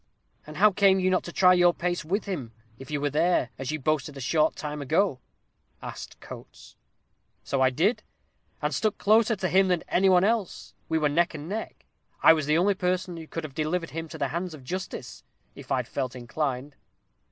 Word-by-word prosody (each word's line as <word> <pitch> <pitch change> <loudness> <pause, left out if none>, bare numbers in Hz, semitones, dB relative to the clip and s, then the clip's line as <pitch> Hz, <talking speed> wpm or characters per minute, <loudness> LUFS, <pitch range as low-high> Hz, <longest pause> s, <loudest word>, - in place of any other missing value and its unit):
"And 155 0 -9
how 210 +2 +6
came 195 0 +4
you 185 0 +1
not 185 - +2
to 175 - -6
try 180 +1 +5
your 175 -1 +4
pace 175 0 -2
with 195 +7 -2
him, 140 - -5 0.3
if 135 - -11
you 150 -1 -2
were 145 0 -1
there, 160 -4 +1
as 135 -1 -4
you 155 - -1
boasted 150 0 -1
a - - -7
short 150 +4 +1
time 150 -1 -5
ago?" 155 +1 +1 0.6
asked - - -9
Coates. - - -12 0.7
"So 135 0 -1
I 130 - +5
did, 175 - +1 0.6
and - - 0
stuck 215 -2 0
closer 220 +2 +3
to 190 -2 -2
him 190 +1 +4
than 180 -3 0
any 190 +2 +3
one 180 -1 +5
else. 215 -3 -1 0.2
We 160 - +1
were 155 -1 +2
neck 170 +3 +1
and 150 +1 -7
neck. 215 +4 -6 0.4
I - - +9
was 155 -3 -2
the 150 +1 +3
only 195 +4 +3
person 180 -2 -2
who 165 -1 -9
could 165 - -5
have 150 -3 -7
delivered 160 +3 -2
him 165 +1 -5
to - - -9
the 140 - -1
hands 170 +2 -4
of 140 - -14
justice, 130 - -6 0.3
if - - -12
I'd - - 0
felt 130 -2 -3
inclined." 130 +2 -4
165 Hz, 210 wpm, -26 LUFS, 145-185 Hz, 0.7 s, I